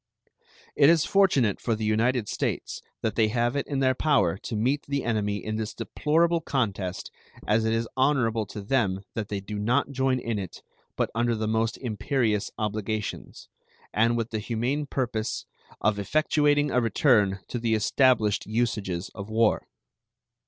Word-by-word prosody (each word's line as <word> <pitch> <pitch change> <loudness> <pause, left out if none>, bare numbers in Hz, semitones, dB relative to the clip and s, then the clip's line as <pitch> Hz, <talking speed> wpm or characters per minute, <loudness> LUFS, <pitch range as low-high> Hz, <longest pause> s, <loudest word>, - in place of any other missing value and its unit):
It 140 - +6
is 165 -2 +4
fortunate 145 - +3
for 115 - 0
the 110 0 -3
United 115 +2 +1
States - - -3 0.2
that 110 - 0
they 110 -1 +3
have 120 +3 0
it 140 - -1
in 140 -2 -1
their 130 -1 +3
power 135 - +2
to - - -5
meet 130 +7 +1
the 140 -1 -1
enemy 105 -3 -1
in 110 0 -2
this 110 -1 -4
deplorable 165 +8 +1
contest 100 - -2 0.3
as 110 +1 +2
it 110 - +1
is 115 0 0
honorable 120 -6 +1
to 105 - -7
them 100 -5 0
that 110 -3 -3
they 100 -1 -3
do 105 +1 -6
not 125 +7 +1
join 130 -1 +1
in 115 -4 -2
it 95 -3 -8 0.3
but - - -1
under 120 +1 +1
the 110 0 -2
most 110 +1 0
imperious 110 -2 -1
obligations, 110 0 -4 0.5
and 115 +2 +3
with 115 0 -3
the 110 - -2
humane 120 +7 -2
purpose 120 -5 -2 0.4
of 105 -1 +2
effectuating 145 +5 +2
a 125 - +3
return 110 -4 +3
to 120 - -3
the 115 -1 +1
established 110 -2 +2
usages 105 -6 -2
of 100 +1 -8
war. 110 0 +2
115 Hz, 165 wpm, -26 LUFS, 105-130 Hz, 0.5 s, It